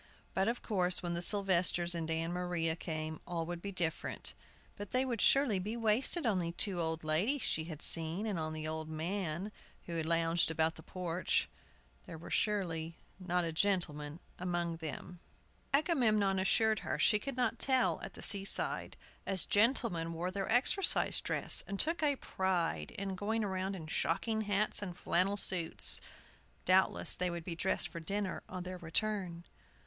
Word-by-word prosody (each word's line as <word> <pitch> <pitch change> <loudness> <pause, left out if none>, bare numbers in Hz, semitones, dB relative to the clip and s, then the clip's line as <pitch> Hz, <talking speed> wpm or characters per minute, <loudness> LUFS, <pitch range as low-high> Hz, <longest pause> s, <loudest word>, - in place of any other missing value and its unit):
But 190 +1 +1
of 235 +1 -2
course, 185 -4 +1
when 175 -1 -2
the 170 - -2
Sylvesters 180 -3 +3
and 165 -1 -3
Ann 165 +1 -1
Maria 175 -2 -1
came, 155 -2 -5
all 170 -2 -2
would 175 0 -5
be 200 - -5
different; 170 -4 -1 0.4
but 205 -1 -7
they 255 +1 +1
would 240 -4 -2
surely 270 -8 +4
be 210 +5 -4
wasted 235 +8 +2
on 205 -5 +2
the 170 -1 -2
two 185 0 0
old 160 0 -2
ladies 190 - +1
she 160 - +1
had 160 -2 -6
seen, 165 +5 0
and 205 -6 -2
on 155 0 -3
the 155 0 -4
old 160 0 -4
men 170 +3 -3 0.3
who 170 - -5
had 160 -1 -2
lounged 165 0 +2
about 160 0 +1
the 160 - -11
porch; 180 0 -1 0.6
there 165 - -8
surely 170 -6 -1 0.2
was 185 - -11
not 180 0 +1
a 165 - -2
gentleman 160 -4 0 0.2
among 175 -2 -2
them. 160 +2 -7 0.5
Agamemnon 230 - +2
assured 220 +2 +2
her - - -3
she 210 - +3
could 275 +3 -6
not 240 -2 0
tell 260 -1 +2
at - - -7
the - - -8
seaside, 200 -1 +3 0.3
as 190 -2 +2
gentlemen 205 -7 +2
wore 175 +3 -3
their 195 +1 -3
exercise 265 - +4
dress, - - +1
and 200 0 -4
took 330 +1 +1
a 290 -2 +3
pride 175 - -1
in 195 -1 -3
going 215 +4 -1
around 190 -1 -2
in 165 -4 -7
shocking 220 +7 -1
hats 205 +1 +1
and 180 -4 -6
flannel 185 +3 +1
suits. 175 -4 +1 0.6
Doubtless 185 +1 +3
they 180 0 -1
would 170 -1 -5
be 175 - -4
dressed 185 +3 +2
for 170 - -7
dinner 195 +4 -3
on 185 -1 -5
their 180 0 -7
return. 175 0 -2
180 Hz, 175 wpm, -33 LUFS, 165-205 Hz, 0.6 s, surely